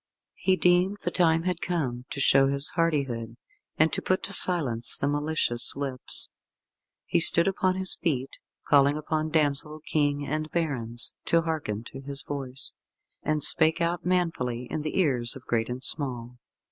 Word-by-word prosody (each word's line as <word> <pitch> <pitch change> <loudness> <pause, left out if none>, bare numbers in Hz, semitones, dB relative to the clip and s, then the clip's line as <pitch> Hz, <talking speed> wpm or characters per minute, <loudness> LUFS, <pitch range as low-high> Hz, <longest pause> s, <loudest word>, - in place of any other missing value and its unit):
He 190 - +3
deemed 180 +2 +3
the - - -1
time 165 -2 +3
had 180 -1 -2
come 130 -9 -2
to 140 - -5
show 135 0 +5
his 140 +1 +1
hardihood, 135 -9 -1 0.4
and 160 +1 +3
to - - 0
put 185 - 0
to 200 - -3
silence 135 - +1
the 140 - -1
malicious 145 -4 -1
lips. 135 -2 -2 0.8
He - - +1
stood 170 +1 +5
upon 185 -1 +1
his 190 0 -1
feet, 135 -6 -2 0.3
calling 140 0 +4
upon 155 +1 -2
damsel, 150 -1 +1
King 145 -1 0
and 155 +2 -3
barons 125 -9 0
to 165 0 +2
hearken 150 -10 -3
to 135 - -8
his 140 0 -2
voice, 135 -2 -4 0.5
and 155 -1 -1
spake 160 0 +4
out 170 0 0
manfully 160 -10 -1
in 155 - -2
the 155 +5 -2
ears 125 -9 +1
of 135 - -12
great 115 -1 0
and 125 +2 -5
small. 125 -5 -2
145 Hz, 160 wpm, -27 LUFS, 130-165 Hz, 0.8 s, show